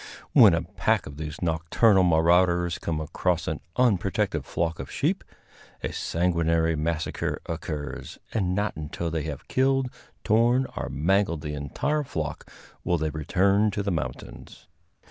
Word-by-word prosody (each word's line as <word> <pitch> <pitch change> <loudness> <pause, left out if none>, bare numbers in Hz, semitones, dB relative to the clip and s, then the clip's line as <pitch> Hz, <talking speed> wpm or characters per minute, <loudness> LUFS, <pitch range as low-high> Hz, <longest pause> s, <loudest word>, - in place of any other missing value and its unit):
When - - +8
a - - -1
pack - - 0
of 70 0 -9
these 75 +2 -6
nocturnal 85 +5 +3
marauders 85 +1 +3
come 80 -2 -2
across 80 - -1
an - - -2 0.2
unprotected 100 -7 +1
flock 85 -1 -2
of 70 - -6
sheep, - - -1 0.6
a - - -3
sanguinary 85 -1 +1
massacre 80 +1 -2
occurs, 75 -4 -5 0.2
and 90 -4 0
not 105 +1 -1
until 75 +2 -4
they 80 -1 -1
have 75 -3 -6
killed, 135 -1 +1 0.3
torn 120 +4 +3
or - - -3
mangled 85 +1 +1
the 75 -2 -4
entire 145 - -1
flock 80 - -5 0.3
will 90 - +1
they 80 -1 -1
return 95 +7 +2
to 100 0 -2
the 100 - -1
mountains. 65 -7 -6
85 Hz, 145 wpm, -26 LUFS, 80-100 Hz, 0.6 s, When